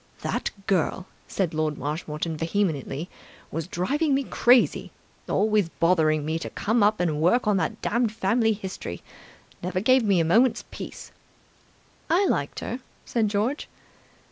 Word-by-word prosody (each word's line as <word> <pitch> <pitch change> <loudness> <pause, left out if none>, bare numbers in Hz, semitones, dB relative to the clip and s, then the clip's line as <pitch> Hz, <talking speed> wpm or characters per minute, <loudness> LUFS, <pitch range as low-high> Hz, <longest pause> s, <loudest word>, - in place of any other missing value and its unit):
"That - - -1 0.2
girl," 185 0 0 0.2
said 180 -4 -1
Lord 155 -1 -1
Marshmoreton 150 +3 -3
vehemently, 165 -3 -1 0.4
"was 165 +1 -3
driving 275 - 0
me 275 - +1
crazy. 245 -1 +3 0.4
Always 210 -4 +2
bothering 160 -3 +2
me 160 +1 -1
to - - -5
come 225 +2 0 0.2
and 155 -4 0
work 235 +10 +3
on 210 -2 +3
that - - -1
damned 235 0 +1
family 225 +1 +2
history. 190 - -6 0.6
Never 180 +1 -1
gave 255 +5 +4
me 200 -4 +3
a 165 - +2
moment's 225 +9 +3
peace.. - - -8 0.5
." - - -34
"I 365 +5 +4
liked - - -1
her," 250 - -4 0.3
said 230 -3 +1
George. 215 +8 -1
190 Hz, 140 wpm, -25 LUFS, 160-230 Hz, 0.6 s, gave